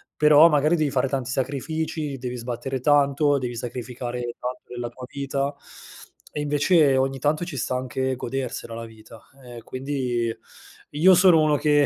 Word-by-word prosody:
però 150 Hz, +1 st, +7 dB
magari 155 Hz, +1 st, +2 dB
devi 155 Hz, -2 st, +1 dB
fare 135 Hz, -1 st, 0 dB
tanti 130 Hz, -2 st, -2 dB
sacrifici, 145 Hz, +2 st, -3 dB
devi 125 Hz, -1 st, -5 dB
sbattere 125 Hz, +2 st, -4 dB
tanto, 145 Hz, +1 st, +3 dB
devi 120 Hz, -2 st, -4 dB
sacrificare 125 Hz, +1 st, -5 dB, 0.2 s
tanto 125 Hz, +1 st, -5 dB
della 120 Hz, -1 st, -4 dB
tua 125 Hz, +2 st, -10 dB
vita 140 Hz, 0 st, -2 dB, 0.8 s
e -, -, -5 dB
invece, 145 Hz, 0 st, +3 dB
ogni 135 Hz, 0 st, 0 dB
tanto 150 Hz, +5 st, 0 dB
ci 170 Hz, -4 st, -7 dB
sta 130 Hz, +1 st, -2 dB
anche 130 Hz, +1 st, -2 dB
godersela 130 Hz, -2 st, -5 dB
la 115 Hz, 0 st, -6 dB
vita. 110 Hz, 0 st, -14 dB, 0.2 s
Ehm, 120 Hz, -1 st, -10 dB
quindi 130 Hz, -3 st, -2 dB, 0.6 s
io 175 Hz, +6 st, +5 dB
sono 175 Hz, -3 st, +6 dB
uno 150 Hz, -1 st, +3 dB
che 145 Hz, 0 st, +3 dB
135 Hz, 155 wpm, -24 LUFS, 125-145 Hz, 0.8 s, però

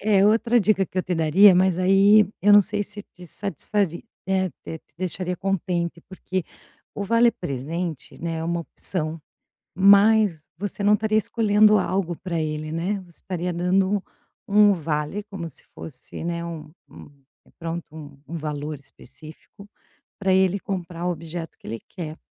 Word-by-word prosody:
Eh, 200 Hz, -2 st, +3 dB
outra 230 Hz, +2 st, +3 dB
dica 195 Hz, -1 st, +2 dB
que 185 Hz, -, -5 dB
eu -, -, +1 dB
te 180 Hz, -1 st, -2 dB
daria, 175 Hz, +5 st, +6 dB
mas 185 Hz, -1 st, +3 dB
aí, 195 Hz, +2 st, +5 dB
eu 205 Hz, -, +6 dB
não 205 Hz, -, +9 dB
sei 205 Hz, -, -2 dB
se 205 Hz, 0 st, -8 dB
te 180 Hz, -3 st, -15 dB
satisfari 195 Hz, -1 st, -2 dB, 0.2 s
eh, 190 Hz, -1 st, +1 dB
te 160 Hz, -, -7 dB
te -, -, -36 dB
deixaria 180 Hz, 0 st, -3 dB
contente, 175 Hz, -3 st, -2 dB
porque 185 Hz, -1 st, -4 dB, 0.5 s
o 200 Hz, -, -3 dB
vale 230 Hz, +3 st, +4 dB
presente, 160 Hz, -, -5 dB
né, 165 Hz, -1 st, -3 dB
é 160 Hz, -, -3 dB
uma 170 Hz, +1 st, -1 dB
opção, 165 Hz, -1 st, -3 dB, 0.5 s
mas 200 Hz, -2 st, +5 dB
você 205 Hz, +2 st, -4 dB
não 205 Hz, +1 st, +5 dB
estaria 215 Hz, 0 st, +1 dB
escolhendo 215 Hz, -1 st, +4 dB
algo 185 Hz, -2 st, -1 dB
pra 170 Hz, -2 st, -3 dB
ele, 155 Hz, 0 st, -3 dB
né, 170 Hz, +5 st, -1 dB
você 170 Hz, -2 st, -18 dB
estaria 180 Hz, -1 st, -4 dB
dando 190 Hz, +3 st, +1 dB, 0.5 s
um 205 Hz, 0 st, +6 dB
vale, 155 Hz, +3 st, -3 dB
como 195 Hz, -5 st, -7 dB
se -, -, -13 dB
fosse, 135 Hz, +1 st, -8 dB
né, 170 Hz, 0 st, -3 dB
um 160 Hz, -3 st, -7 dB, 0.2 s
um 140 Hz, -2 st, -18 dB
pronto 165 Hz, -1 st, -6 dB
um 145 Hz, -3 st, -11 dB
um 170 Hz, -, -5 dB
valor 150 Hz, -1 st, -4 dB
específico, 155 Hz, +8 st, -15 dB, 0.5 s
pra 190 Hz, -2 st, +1 dB
ele 190 Hz, +1 st, +3 dB
comprar 180 Hz, -3 st, -4 dB
objeto 165 Hz, -1 st, -5 dB
que -, -, -15 dB
ele 115 Hz, 0 st, -5 dB
quer, 160 Hz, -4 st, -7 dB
180 Hz, 160 wpm, -24 LUFS, 160-200 Hz, 0.5 s, não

